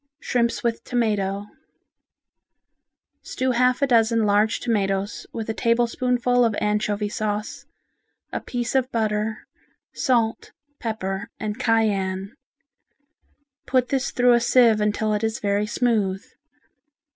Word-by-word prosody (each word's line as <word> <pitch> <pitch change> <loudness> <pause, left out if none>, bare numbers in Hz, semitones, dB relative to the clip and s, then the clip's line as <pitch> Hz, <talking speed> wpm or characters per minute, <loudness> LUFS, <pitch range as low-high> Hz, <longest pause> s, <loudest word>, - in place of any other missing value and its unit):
Shrimps 235 -4 0
with 230 -1 -1
Tomato 205 -5 -1 1.8
Stew 255 0 -2
half 250 +2 +2
a - - +6
dozen 230 -3 +3
large 210 +2 +2
tomatoes 200 -3 -1
with 225 -1 -5
a 225 - -1
tablespoonful 245 +2 +1
of 225 -3 +1
anchovy 210 0 0
sauce, 210 0 -4 0.7
a - - -1
piece 240 -2 -3
of 260 -1 +1
butter, 215 -1 -1 0.5
salt, 235 -5 0 0.3
pepper 205 -2 -3
and 215 +2 -4
cayenne. 200 -4 0 1.3
Put 255 -1 +1
this 270 -1 0
through 245 0 +3
a 240 - +5
sieve 235 -2 +4
until 210 +1 0
it 210 +1 -1
is 220 0 0
very 205 +1 0
smooth. 210 -5 0
225 Hz, 115 wpm, -23 LUFS, 210-240 Hz, 1.8 s, a